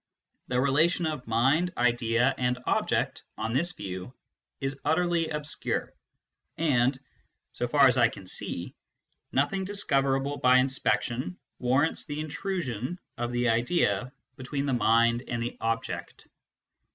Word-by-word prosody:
} - - -51
The 125 0 0
relation 155 +6 +3
of 150 -6 -3
mind, 135 +11 +2
idea, 120 +1 +2
and 125 0 +1
object, - - 0 0.2
on 115 - -2
this 170 +7 +1
view, 95 - -7 0.4
is 135 0 -3
utterly 165 +1 +1
obscure, 150 -1 -2 0.6
and, 130 -5 +2 0.6
so 120 - -2
far 140 +3 +5
as 130 -1 +4
I 120 - +6
can 100 - -10
see, 90 - -4 0.6
nothing 145 +8 +1
discoverable 140 -8 0
by 125 0 +5
inspection 130 -6 +1 0.2
warrants 135 +6 +1
the 145 0 -5
intrusion 155 - -3 0.2
of 120 0 -2
the 120 0 +1
idea 120 - +1 0.3
between 140 +2 -3
the 135 - 0
mind 115 +1 +3
and 120 - -2
the 120 - -4
object. 115 0 -3
130 Hz, 130 wpm, -28 LUFS, 120-150 Hz, 0.6 s, I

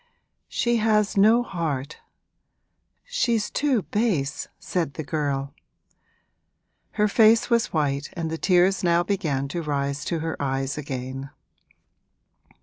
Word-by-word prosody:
'She 240 0 +1
has 215 -2 +2
no 220 +4 +5
heart 160 - -4 1.1
she's 240 - 0
too 270 -8 +1
base!' 185 -11 -1
said 165 -7 -3
the 155 - -4
girl. 140 -2 -2 1.4
Her 210 0 +2
face 225 +3 +4
was 235 -1 +3
white 145 -3 -1
and 165 -2 -3
the 160 - -2
tears 185 +1 +3
now 170 0 +3
began 160 -8 -1
to 170 +4 -3
rise 140 -2 -2
to 170 - -1
her 160 0 -3
eyes 135 0 -1
again. 135 -1 -5
165 Hz, 120 wpm, -24 LUFS, 140-210 Hz, 1.4 s, no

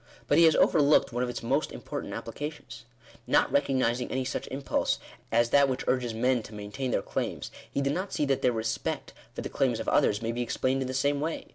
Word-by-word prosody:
But 145 - +3
he 170 - +8
has 160 - +5
overlooked 145 -4 +4
one 120 - -1
of 125 - 0
its 120 - -5
most 135 +6 0
important - - -6
applications. 145 -6 -7 0.4
Not - - +3
recognising 130 -3 +1
any 130 0 -1
such 130 - -3
impulse 135 +1 -1 0.3
as 115 +1 +3
that 140 -1 +5
which 130 0 -2
urges 125 -2 +1
men 125 +1 +2
to 110 0 -11
maintain 105 +6 -4
their - - 0
claims,. - - -3 0.2
he 140 - -1
did 140 0 +1
not 185 +4 -3
see 150 - 0
that 135 -1 0
their 125 - +3
respect 110 -1 -3 0.2
for - - -4
the - - -4
claims - - 0
of - - -5
others, 100 - +3
may 115 - 0
be 120 +1 -3
explained 130 +2 0
in 130 - -2
the 130 - -4
same 140 +2 +1
way. 160 +2 -3
130 Hz, 225 wpm, -28 LUFS, 120-140 Hz, 0.4 s, he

